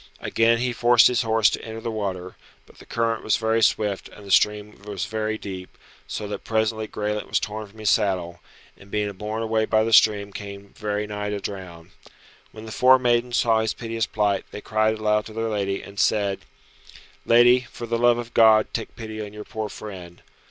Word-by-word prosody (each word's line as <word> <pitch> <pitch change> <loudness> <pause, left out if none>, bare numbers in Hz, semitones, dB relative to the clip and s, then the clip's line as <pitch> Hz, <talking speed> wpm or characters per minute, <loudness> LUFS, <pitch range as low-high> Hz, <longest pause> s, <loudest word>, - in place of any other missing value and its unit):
Again 115 +1 +2
he 125 +1 -1
forced 120 0 +5
his 125 -1 +4
horse 110 -2 +3
to - - -4
enter 110 0 -7
the 115 0 -4
water; 95 -4 -4 0.3
but - - -20
the - - -15
current 115 -1 -1
was 110 - +2
very 115 0 +1
swift 105 -2 +1
and 105 - -14
the 100 - -7
stream 105 +1 +2
was 100 -3 -4
very 110 0 -2
deep, 95 -3 -8 0.3
so 105 +10 -5
that 100 0 -6
presently 110 0 -1
Graelent 105 0 -3
was - - +1
torn 105 0 -5
from 100 +2 -20
his 110 -2 +1
saddle, 90 -5 0 0.4
and 100 - -17
being 105 0 -1
borne 105 +3 -4
away 110 0 +1
by 110 0 +2
the 115 +1 -1
stream 100 -2 +4
came 100 -1 -9
very 105 0 -2
nigh 105 0 -4
to 105 0 -3
drown. 90 -4 -8 0.6
When 110 0 -11
the 110 - -8
four 130 +3 +6
maidens 120 -1 +1
saw 115 -2 +3
his 110 -1 -1
piteous 115 -1 -3
plight 105 -2 0
they - - -8
cried 110 +1 0
aloud 105 0 +1
to 110 - -11
their 115 0 -2
lady, 100 -2 -2
and 100 0 -10
said, 100 -2 +1 0.8
"Lady, 120 +1 +5
for 120 - -7
the 115 0 -1
love 120 0 +4
of 120 -1 -6
God, 110 -1 +5
take 115 - -5
pity 110 -1 -7
on 105 -1 -7
your 105 0 -8
poor 110 -1 -5
friend. 90 -5 -10
110 Hz, 205 wpm, -24 LUFS, 100-115 Hz, 0.8 s, four